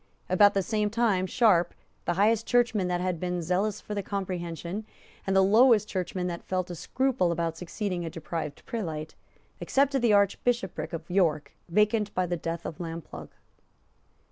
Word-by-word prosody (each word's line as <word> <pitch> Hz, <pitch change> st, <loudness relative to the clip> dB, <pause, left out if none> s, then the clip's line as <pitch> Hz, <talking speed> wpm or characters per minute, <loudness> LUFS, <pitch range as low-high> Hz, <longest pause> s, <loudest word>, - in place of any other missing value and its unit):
About 205 Hz, +3 st, +5 dB
the 195 Hz, -, +2 dB
same 210 Hz, 0 st, 0 dB
time 210 Hz, -4 st, +1 dB
Sharp, 185 Hz, -7 st, +3 dB, 0.3 s
the 175 Hz, -, +1 dB
highest 215 Hz, +4 st, +2 dB
churchman 240 Hz, -6 st, +2 dB
that 180 Hz, 0 st, -1 dB
had 180 Hz, -2 st, -1 dB
been 180 Hz, -1 st, -2 dB
zealous 185 Hz, +5 st, 0 dB
for 210 Hz, -, -7 dB
the 205 Hz, -, -1 dB
Comprehension, 185 Hz, -1 st, -4 dB, 0.4 s
and 195 Hz, -, +1 dB
the 190 Hz, -, +6 dB
lowest 215 Hz, +1 st, +5 dB
churchman 180 Hz, -1 st, -3 dB
that 170 Hz, -1 st, -4 dB
felt 185 Hz, -1 st, -2 dB
a -, -, -5 dB
scruple 250 Hz, -1 st, 0 dB
about 165 Hz, -1 st, -1 dB
succeeding 180 Hz, +1 st, -4 dB
a 165 Hz, -, -3 dB
deprived 160 Hz, -2 st, -6 dB
prelate, 160 Hz, -9 st, -4 dB, 0.5 s
accepted 275 Hz, -1 st, +2 dB
the 235 Hz, -2 st, +3 dB
Archbishopric 200 Hz, -4 st, +1 dB
of 165 Hz, -1 st, -6 dB
York, 170 Hz, -5 st, +1 dB, 0.2 s
vacant 210 Hz, +3 st, +2 dB
by 185 Hz, -, +1 dB
the 175 Hz, 0 st, -1 dB
death 165 Hz, 0 st, -4 dB
of 155 Hz, -, -6 dB
Lamplugh. 165 Hz, -2 st, -7 dB
185 Hz, 165 wpm, -28 LUFS, 170-210 Hz, 0.5 s, the